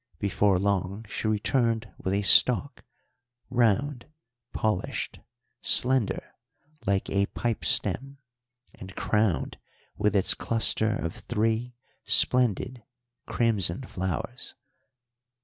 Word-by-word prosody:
Before 100 Hz, 0 st, +1 dB
long 100 Hz, +2 st, -2 dB
she 105 Hz, -, -4 dB
returned 115 Hz, +1 st, -1 dB
with 95 Hz, +1 st, -2 dB
a 100 Hz, -, -1 dB
stalk, 125 Hz, +7 st, +5 dB, 0.7 s
round, 125 Hz, +2 st, 0 dB, 0.4 s
polished, 110 Hz, -4 st, -3 dB, 0.4 s
slender, 130 Hz, -3 st, +2 dB, 0.6 s
like 100 Hz, 0 st, 0 dB
a 100 Hz, 0 st, +1 dB
pipe 115 Hz, -7 st, -3 dB
stem, 135 Hz, -, 0 dB, 0.6 s
and 95 Hz, 0 st, -12 dB
crowned 105 Hz, -5 st, -1 dB, 0.4 s
with 105 Hz, 0 st, 0 dB
its 95 Hz, -, +4 dB
cluster 110 Hz, -1 st, +1 dB
of 85 Hz, -5 st, -4 dB
three 115 Hz, +2 st, -2 dB, 0.3 s
splendid 125 Hz, 0 st, +3 dB, 0.5 s
crimson 105 Hz, -3 st, 0 dB
flowers. 110 Hz, +4 st, -5 dB
110 Hz, 95 wpm, -26 LUFS, 100-120 Hz, 0.7 s, stalk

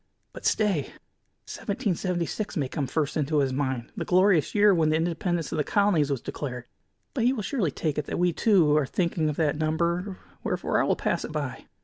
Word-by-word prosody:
But, -, -, -3 dB
stay! 200 Hz, -10 st, +1 dB, 0.5 s
Seventeen 200 Hz, -1 st, -2 dB
seventy 175 Hz, 0 st, -1 dB
six 210 Hz, +3 st, -4 dB
may 140 Hz, -4 st, 0 dB
come 140 Hz, 0 st, -3 dB
first 145 Hz, +2 st, -1 dB
into 150 Hz, 0 st, 0 dB
his 135 Hz, -2 st, +2 dB
mind, 130 Hz, -3 st, -2 dB
the -, -, -3 dB
glorious 185 Hz, -3 st, +3 dB
year 205 Hz, -1 st, +6 dB
when 160 Hz, -3 st, +2 dB
the 155 Hz, -, +2 dB
independence 170 Hz, 0 st, -1 dB
of 160 Hz, -, -2 dB
the -, -, +2 dB
colonies 190 Hz, -6 st, +2 dB
was 135 Hz, -4 st, -1 dB
declared. 125 Hz, -4 st, -5 dB, 0.5 s
But 235 Hz, -4 st, 0 dB
he 250 Hz, -, +4 dB
will 220 Hz, -6 st, -3 dB
surely 195 Hz, -, 0 dB
take 150 Hz, +1 st, -2 dB
it 150 Hz, -, -3 dB
that -, -, -4 dB
we, 175 Hz, -1 st, +2 dB
too, 170 Hz, -7 st, +4 dB
are 145 Hz, -3 st, +1 dB
thinking 170 Hz, -2 st, 0 dB
of 150 Hz, -, -2 dB
that 150 Hz, -1 st, 0 dB
number, 170 Hz, +5 st, 0 dB, 0.3 s
wherefore -, -, 0 dB
I -, -, +1 dB
will -, -, +2 dB
pass -, -, -1 dB
it -, -, -6 dB
by." -, -, -4 dB
165 Hz, 215 wpm, -26 LUFS, 150-185 Hz, 0.5 s, year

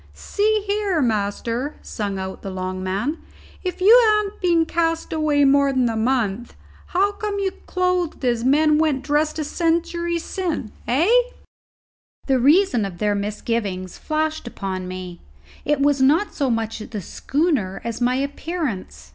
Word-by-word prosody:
"See, 425 Hz, 0 st, 0 dB
here, 405 Hz, -4 st, 0 dB
master," 230 Hz, +3 st, -1 dB
sung 200 Hz, -3 st, -4 dB
out 190 Hz, 0 st, -5 dB
the 195 Hz, -, -6 dB
long 185 Hz, 0 st, -4 dB
man, 200 Hz, -, -2 dB, 0.4 s
"if 365 Hz, -1 st, -4 dB
you 465 Hz, +6 st, +8 dB
han't 425 Hz, -1 st, 0 dB
been 340 Hz, -3 st, +3 dB
cast 330 Hz, -1 st, -1 dB
away 300 Hz, -2 st, +2 dB
more 280 Hz, 0 st, +4 dB
than 260 Hz, -2 st, +2 dB
a 225 Hz, -, -2 dB
month, 230 Hz, -1 st, -1 dB, 0.3 s
how 395 Hz, +3 st, +2 dB
come 410 Hz, 0 st, -4 dB
you 390 Hz, -1 st, 0 dB, 0.2 s
clothed 360 Hz, -5 st, 0 dB
as 235 Hz, -2 st, +1 dB
men 300 Hz, +3 st, +4 dB
went 295 Hz, -4 st, +1 dB
dressed 300 Hz, +2 st, 0 dB
a 310 Hz, -, -1 dB
century 340 Hz, +2 st, 0 dB
sin', 335 Hz, -, -3 dB, 0.2 s
hey?" 300 Hz, -, +3 dB, 1.1 s
The 265 Hz, -2 st, +2 dB
reason 285 Hz, -, +4 dB
of 195 Hz, -3 st, -5 dB
their 210 Hz, +2 st, +1 dB
misgivings 205 Hz, -2 st, -3 dB
flashed 310 Hz, -3 st, -2 dB
upon 190 Hz, -5 st, -4 dB
me. 185 Hz, -1 st, -7 dB, 0.5 s
It 295 Hz, -1 st, +1 dB
was 285 Hz, -1 st, +3 dB
not 310 Hz, +10 st, +3 dB
so 275 Hz, -3 st, 0 dB
much 225 Hz, -1 st, -1 dB
the 215 Hz, 0 st, -6 dB
schooner 265 Hz, -, -1 dB
as 230 Hz, 0 st, -4 dB
my 250 Hz, +1 st, +2 dB
appearance. 280 Hz, -, -4 dB
280 Hz, 150 wpm, -22 LUFS, 220-340 Hz, 1.1 s, you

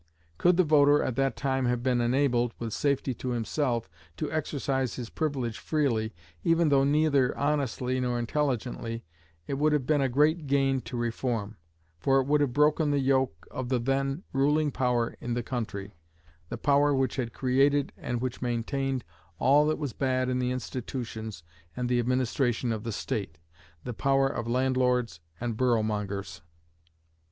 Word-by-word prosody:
Could 180 Hz, 0 st, +4 dB
the 185 Hz, -, +6 dB
voter 145 Hz, -2 st, +5 dB
at 130 Hz, -, -2 dB
that 135 Hz, 0 st, +1 dB
time 135 Hz, -2 st, 0 dB
have 120 Hz, -1 st, 0 dB
been 125 Hz, -2 st, +2 dB
enabled, 120 Hz, -1 st, +1 dB
with 115 Hz, -2 st, -4 dB
safety 140 Hz, -2 st, 0 dB
to 125 Hz, -, -5 dB
himself, 120 Hz, -, -1 dB, 0.3 s
to -, -, -3 dB
exercise 135 Hz, -4 st, -1 dB
his 120 Hz, -3 st, -6 dB
privilege 135 Hz, -7 st, -2 dB
freely, 120 Hz, -8 st, 0 dB, 0.3 s
even 165 Hz, -1 st, +3 dB
though 140 Hz, -1 st, +4 dB
neither 140 Hz, -2 st, +2 dB
honestly 135 Hz, -3 st, 0 dB
nor 125 Hz, -1 st, 0 dB
intelligently, 120 Hz, -3 st, -2 dB, 0.4 s
it 135 Hz, -, -3 dB
would 150 Hz, +1 st, +3 dB
have 145 Hz, -4 st, +1 dB
been 150 Hz, 0 st, +2 dB
a 135 Hz, -, +2 dB
great 150 Hz, +4 st, +2 dB
gain 135 Hz, -1 st, +2 dB
to 125 Hz, -, -4 dB
reform, 115 Hz, -2 st, -2 dB, 0.4 s
for 135 Hz, +9 st, +3 dB
it 130 Hz, -, 0 dB
would 145 Hz, +1 st, +2 dB
have 140 Hz, -3 st, +2 dB
broken 150 Hz, +3 st, +3 dB
the 145 Hz, -, +2 dB
yoke 130 Hz, -, +1 dB
of 130 Hz, -1 st, -4 dB
the 130 Hz, -, +2 dB
then 135 Hz, +6 st, -1 dB
ruling 145 Hz, +2 st, +2 dB
power 125 Hz, -3 st, 0 dB
in 120 Hz, -1 st, -2 dB
the 120 Hz, -, -2 dB
country 105 Hz, -5 st, -4 dB, 0.6 s
the -, -, -4 dB
power 145 Hz, 0 st, +3 dB
which 135 Hz, +1 st, 0 dB
had 120 Hz, -3 st, -2 dB
created 135 Hz, +3 st, +2 dB
and 120 Hz, -1 st, -3 dB
which 130 Hz, -1 st, -3 dB
maintained 130 Hz, +2 st, -1 dB, 0.3 s
all 145 Hz, +4 st, +4 dB
that 155 Hz, -, +1 dB
was 145 Hz, -6 st, -4 dB
bad 130 Hz, -1 st, 0 dB
in 125 Hz, 0 st, 0 dB
the 125 Hz, 0 st, 0 dB
institutions 120 Hz, -6 st, -5 dB, 0.3 s
and 125 Hz, -1 st, -1 dB
the 120 Hz, 0 st, +2 dB
administration 125 Hz, 0 st, 0 dB
of 110 Hz, -1 st, -3 dB
the 115 Hz, -, -3 dB
state 100 Hz, -5 st, -3 dB, 0.5 s
the 125 Hz, -, -4 dB
power 135 Hz, +3 st, +2 dB
of 120 Hz, -4 st, -4 dB
landlords 125 Hz, -, +1 dB, 0.2 s
and 120 Hz, -1 st, -2 dB
boroughmongers. 105 Hz, -8 st, -1 dB
130 Hz, 165 wpm, -28 LUFS, 120-140 Hz, 0.6 s, the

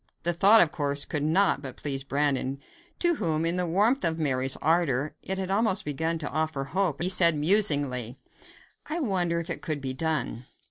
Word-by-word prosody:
The 175 Hz, +1 st, 0 dB
thought, 200 Hz, +6 st, +6 dB
of 165 Hz, -, +2 dB
course, 145 Hz, -1 st, -1 dB
could 150 Hz, -, -3 dB
not 160 Hz, +2 st, +2 dB
but 130 Hz, -3 st, -8 dB
please 135 Hz, -2 st, -3 dB
Brandon, 140 Hz, -1 st, -1 dB, 0.4 s
to 345 Hz, -2 st, +1 dB
whom, 160 Hz, -1 st, -1 dB
in 170 Hz, +1 st, +1 dB
the 180 Hz, -1 st, -1 dB
warmth 210 Hz, +10 st, +2 dB
of 165 Hz, -1 st, +1 dB
Mary's 135 Hz, -4 st, 0 dB
ardor, 155 Hz, -4 st, +1 dB
it 190 Hz, -, -4 dB
had 190 Hz, 0 st, -3 dB
almost 205 Hz, -1 st, +1 dB
begun 160 Hz, +3 st, -2 dB
to 155 Hz, -2 st, -5 dB
offer 155 Hz, -3 st, -2 dB
hope; 165 Hz, +1 st, -1 dB
and -, -, -2 dB
he 180 Hz, -, 0 dB
said 170 Hz, -3 st, +4 dB
musingly: 145 Hz, -, +2 dB, 0.7 s
"I 320 Hz, +2 st, -2 dB
wonder 180 Hz, -, 0 dB
if 165 Hz, -, -5 dB
it -, -, -4 dB
could 155 Hz, -2 st, -3 dB
be 135 Hz, -1 st, -4 dB
done? 135 Hz, -5 st, -3 dB
160 Hz, 195 wpm, -27 LUFS, 140-185 Hz, 0.7 s, thought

